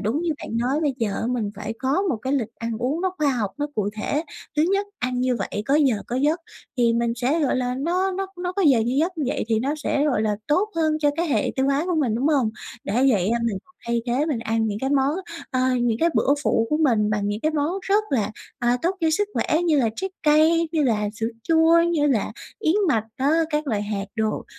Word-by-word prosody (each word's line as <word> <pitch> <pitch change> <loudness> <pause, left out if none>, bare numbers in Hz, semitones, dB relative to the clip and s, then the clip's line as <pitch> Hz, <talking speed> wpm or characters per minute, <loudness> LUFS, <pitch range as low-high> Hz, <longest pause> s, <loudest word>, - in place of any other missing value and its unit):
đúng 220 +9 -1
như 345 - 0
bạn 225 - -4
nói 255 +6 0
bây 290 -4 0
giờ, 220 0 -1
mình 230 -5 -1
phải 210 +2 -4
có 275 +8 +1
một 360 -11 0
cái 260 +5 -3
lịch 235 -5 -1
ăn 230 0 -3
uống 265 +7 -1
nó 375 0 0
khoa 300 -1 +2
học, 225 -7 -1
nó 290 - 0
cụ 205 -2 0
thể. 295 +7 -1 0.3
Thứ 300 - +4
nhất 400 +1 +1
ăn 250 0 -1
như 255 -1 +1
vậy 205 0 -3
có 275 - +2
giờ 280 -5 +4
có 245 - -3
giấc, 300 +6 +1 0.4
thì 235 -2 +3
mình 235 0 +1
sẽ, 265 +7 +1
gọi 280 -4 +1
là, 250 -1 -1
nó 355 +8 0
nó 385 +1 -3
nó 360 0 -2
có 395 +1 -1
giờ 275 -7 +5
như 240 +3 0
giấc 335 +2 0
như 295 - 0
vậy 260 - -1
thì 225 - +2
nó 280 +4 -1
sẽ, 290 -1 0
gọi 250 -8 +1
là, 210 -1 0
tốt 365 +8 +2
hơn 315 -1 +1
cho 295 -1 +3
cái 340 +1 0
hệ 225 -8 +1
tiêu 265 0 +2
hóa 280 +3 +1
của 360 - -1
mình, 270 -9 +1
đúng 250 +5 0
hông? 270 -8 +2 0.3
Đã - - -3 0.2
vậy, 195 -4 +1
a, 235 - +1
mình 220 -5 -1 0.3
thay 235 0 0
thế, 255 +5 +1
mình 295 -7 -1
ăn 225 0 0
những 205 -1 -2
cái 265 +4 -2
món, 280 +1 +2 0.4
ờ, 255 - 0 0.2
những 235 -2 +1
cái 335 - +4
bữa 280 - +3
phụ 225 -5 +2
của 300 - +3
mình 230 -9 +2
bằng 205 -1 0
những 205 +1 -2
cái 310 - +1
món 300 +2 0
rất 410 +3 +2
là, 220 -6 +1 0.3
à, 240 0 +2
tốt 360 +3 0
cho 320 -1 +2
sức 410 +6 +1
khỏe 320 +3 +1
như 320 -4 +3
là 240 -4 +3
trái 385 0 -3
cây, 315 +2 +4
như 315 - +2
là 215 -6 +1
sữa 225 +1 -2 0.2
chua, 325 +3 +5
như 335 -3 +2
là 245 -8 +1 0.3
yến 360 -6 +1
mạch 225 -7 +2
á, 270 +2 +1 0.2
các 300 0 -1
loại 215 -6 0
hạt 205 -1 -3
đồ. 220 -1 -1
270 Hz, 255 wpm, -23 LUFS, 230-315 Hz, 0.4 s, giờ